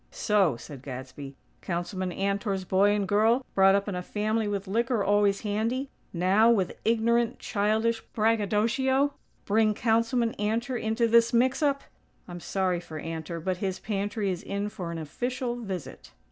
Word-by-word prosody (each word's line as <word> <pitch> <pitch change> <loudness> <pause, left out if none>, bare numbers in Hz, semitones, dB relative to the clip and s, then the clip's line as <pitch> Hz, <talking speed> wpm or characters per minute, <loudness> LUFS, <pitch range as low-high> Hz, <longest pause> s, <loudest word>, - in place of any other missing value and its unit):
"So," 195 - +1
said 140 +1 -10
Gadsby, 135 +1 -8 0.3
"Councilman 185 +1 -3
Antor's 195 0 -1
boy 195 +2 +3
and 205 -1 +1
girl, 225 +6 +3
brought 195 0 +5
up 200 +1 0
in 205 - -2
a 180 - -3
family 215 +3 -1
with 200 -1 -3
liquor 230 +2 0
always 205 0 +2
handy, 230 +6 -2 0.2
now, 190 +6 +3
with 200 -6 +2
ignorant, 235 +1 +2
childish 220 +2 0
braggadocio, 230 +6 +2 0.3
bring 215 +1 +2
Councilman 230 +1 +1
Antor 230 +5 -1
into 225 +2 +1
this 230 +1 +4
mix 255 +4 +2
up! 280 -2 +1 0.4
I'm 175 0 -7
sorry 185 0 -1
for 160 -2 -8
Antor; 165 +1 -5
but 185 0 -1
his 190 -1 -2
pantry 205 -1 -2
is 180 - -4
in 200 +1 -3
for 175 -4 -6
an 170 - -5
official 245 - -3
visit." 195 -8 -7
210 Hz, 155 wpm, -27 LUFS, 190-230 Hz, 0.4 s, brought